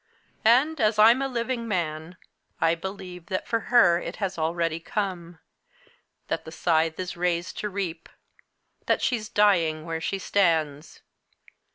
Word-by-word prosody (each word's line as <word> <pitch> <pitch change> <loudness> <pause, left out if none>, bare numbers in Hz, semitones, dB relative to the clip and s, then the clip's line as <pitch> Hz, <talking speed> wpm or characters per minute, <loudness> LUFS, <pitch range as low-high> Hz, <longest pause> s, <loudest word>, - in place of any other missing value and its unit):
And, 265 +7 +4
as 215 0 +2
I'm 230 +5 +6
a 275 - 0
living 235 -1 -3
man, 170 -3 -3 0.4
I 165 - +3
believe 180 -1 -7
that 185 - -3
for 230 - 0
her 180 -9 +5
it - - -6
has 195 -3 -3
already 165 0 -1
come; 175 -2 -4 0.9
that - - -2
the 160 - -10
scythe 160 -1 +1
is 185 -1 -4
raised 175 0 -2
to 210 - -2
reap; 180 -4 -5 0.8
that - - +1
she's 220 -4 -1
dying 170 -7 +2
where 165 -1 -4
she 195 - -2
stands. 160 -6 0
180 Hz, 145 wpm, -26 LUFS, 165-210 Hz, 0.9 s, I'm